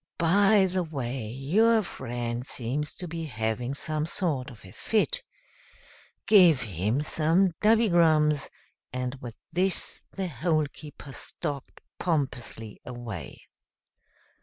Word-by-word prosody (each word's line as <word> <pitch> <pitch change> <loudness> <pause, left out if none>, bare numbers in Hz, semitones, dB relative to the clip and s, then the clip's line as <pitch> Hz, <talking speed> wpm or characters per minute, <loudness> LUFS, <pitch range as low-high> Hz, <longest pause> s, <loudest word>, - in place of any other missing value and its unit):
By 195 +4 +5
the 185 0 0
way, 135 -7 -4
your 205 - +3
friend 120 -5 -4
seems 135 +3 -3
to 180 - -6
be 165 0 -4
having 120 0 -2
some 155 +2 -2
sort 155 -8 0
of 115 -5 -14
a 95 - -12
fit. 355 - 0 1.0
Give 180 -9 +7
him 105 - -1
some 165 +5 +2
dubbygrums;" 170 -9 +4 0.4
and 125 0 -2
with 120 -2 -7 0.2
this 185 +2 +1
the 190 -2 -3
Hole 155 +1 +1
keeper 145 -2 -10
stalked 140 +1 -6 0.2
pompously 130 - -2
away. 120 - -7
150 Hz, 110 wpm, -27 LUFS, 125-180 Hz, 1.0 s, Give